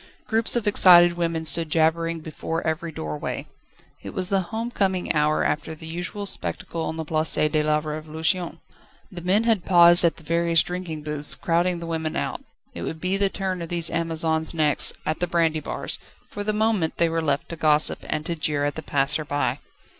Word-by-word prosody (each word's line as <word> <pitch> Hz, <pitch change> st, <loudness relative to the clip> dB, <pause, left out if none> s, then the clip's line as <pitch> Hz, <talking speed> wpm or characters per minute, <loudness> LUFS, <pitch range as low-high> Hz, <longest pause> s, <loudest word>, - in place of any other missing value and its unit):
Groups 225 Hz, +1 st, +2 dB
of 235 Hz, -3 st, -1 dB
excited 175 Hz, -4 st, +7 dB
women 165 Hz, -2 st, -2 dB
stood 165 Hz, 0 st, +4 dB
jabbering 165 Hz, +1 st, +1 dB
before 165 Hz, +1 st, -5 dB
every 160 Hz, +1 st, -2 dB
doorway. 75 Hz, -, -5 dB, 0.6 s
It -, -, -9 dB
was 185 Hz, 0 st, -2 dB
the 195 Hz, -2 st, +2 dB
home 230 Hz, +2 st, -4 dB
coming 190 Hz, -5 st, 0 dB
hour 150 Hz, 0 st, +1 dB
after 160 Hz, +1 st, -2 dB
the 160 Hz, -, -11 dB
usual 180 Hz, +5 st, -5 dB
spectacle 170 Hz, -3 st, -3 dB
on 160 Hz, -, -4 dB
the 160 Hz, -, -4 dB
Place 155 Hz, 0 st, +1 dB
de 155 Hz, 0 st, +1 dB
la 150 Hz, 0 st, +1 dB
Révolution. 155 Hz, +3 st, -3 dB, 0.5 s
The 180 Hz, -2 st, -8 dB
men 190 Hz, +5 st, +2 dB
had 225 Hz, -6 st, +1 dB
paused 175 Hz, -1 st, +6 dB
at 170 Hz, -, +3 dB
the 165 Hz, -, -15 dB
various 170 Hz, +1 st, +2 dB
drinking 175 Hz, -4 st, -6 dB
booths, 150 Hz, -2 st, +2 dB
crowding 170 Hz, +5 st, 0 dB
the 170 Hz, -, -7 dB
women 160 Hz, -1 st, -3 dB
out. -, -, -3 dB, 0.3 s
It 85 Hz, -, -7 dB
would 160 Hz, -, -5 dB
be 185 Hz, +3 st, -1 dB
the 200 Hz, 0 st, +2 dB
turn 190 Hz, -2 st, -4 dB
of 165 Hz, -, -6 dB
these 170 Hz, -1 st, +2 dB
Amazons 165 Hz, -1 st, 0 dB
next, 150 Hz, -2 st, +1 dB
at 155 Hz, -, -2 dB
the 180 Hz, -, 0 dB
brandy 165 Hz, -2 st, +1 dB
bars; -, -, -4 dB, 0.3 s
for 205 Hz, -, -6 dB
the 215 Hz, -, 0 dB
moment 215 Hz, -6 st, 0 dB
they 170 Hz, -, +3 dB
were 165 Hz, 0 st, -1 dB
left 145 Hz, -3 st, -1 dB
to 170 Hz, -, -5 dB
gossip, 155 Hz, -1 st, +3 dB
and 155 Hz, -, -2 dB
to 170 Hz, 0 st, -3 dB
jeer 150 Hz, -2 st, -1 dB
at 145 Hz, -, -1 dB
the 160 Hz, -, -6 dB
passer 145 Hz, +1 st, +1 dB
by. 145 Hz, -1 st, -2 dB
165 Hz, 200 wpm, -23 LUFS, 155-180 Hz, 0.6 s, excited